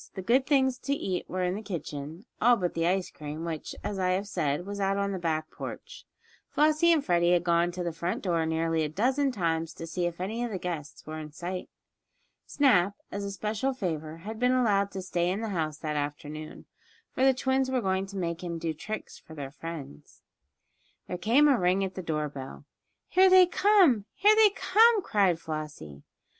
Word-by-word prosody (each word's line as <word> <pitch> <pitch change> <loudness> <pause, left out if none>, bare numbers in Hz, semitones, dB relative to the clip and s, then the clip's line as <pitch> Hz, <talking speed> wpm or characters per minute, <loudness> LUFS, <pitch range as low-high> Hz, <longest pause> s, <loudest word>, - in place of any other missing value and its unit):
The 190 - -5
good 255 +6 +2
things 265 -3 +2
to 280 - -1
eat 185 -9 -3
were 185 +1 -2
in 180 0 0
the 205 - -4
kitchen, 160 - -6 0.2
all 240 +1 +5
but 180 -4 -2
the 165 0 0
ice 185 +1 0
cream, 150 +2 -7
which, 160 -2 -5
as 200 -2 -3
I 185 -1 +1
have 195 +2 -2
said, 160 -3 -1
was 200 0 -5
out 195 0 +1
on 200 0 0
the 190 - -3
back 155 -2 -2
porch. - - -8 0.4
Flossie 310 +3 +3
and 310 -4 +2
Freddie 175 -1 +3
had 175 -1 +2
gone 170 0 +2
to 180 0 -4
the 170 -1 -3
front 170 +2 -3
door 170 -4 +1
nearly 165 0 0
a 155 - 0
dozen 260 - +1
times 165 -6 -1
to 165 - -7
see 175 +2 -1
if 170 0 -6
any 220 +6 -3
of 240 - -2
the 200 - -3
guests 165 -5 -6
were 155 +1 -6
in 155 -1 -8
sight. 180 +3 -5 0.8
Snap, 205 -9 +3 0.2
as 200 - -4
a 200 - -3
special 210 +7 -2
favor, 160 - -4
had 215 +6 -7
been 250 +1 +3
allowed 205 -6 +2
to 190 -2 -6
stay 175 -1 0
in 195 +4 -2
the 225 - -3
house 155 -6 -2
that 155 -2 -4
afternoon, 150 +1 -5 0.5
for 260 - -1
the 270 - +7
twins 265 0 0
were 260 -1 +1
going 190 -2 -1
to 200 0 -8
make 170 -1 -3
him 170 -1 -4
do 165 -1 -2
tricks 215 +8 -7
for 160 - -13
their 140 -2 -6
friends. 150 - -9 0.8
There - - -4
came 245 +11 +4
a 270 -5 +4
ring 180 +2 +2
at 190 -1 -3
the 185 - -5
door 155 -3 -2
bell. 140 0 -9 0.4
"Here 375 +1 +5
they 370 0 +8
come! 355 - +4
Here 420 +1 +5
they 435 -1 +7
come!" 440 +1 +4
cried 195 - +2
Flossie. 150 - -7
185 Hz, 210 wpm, -28 LUFS, 165-230 Hz, 0.8 s, they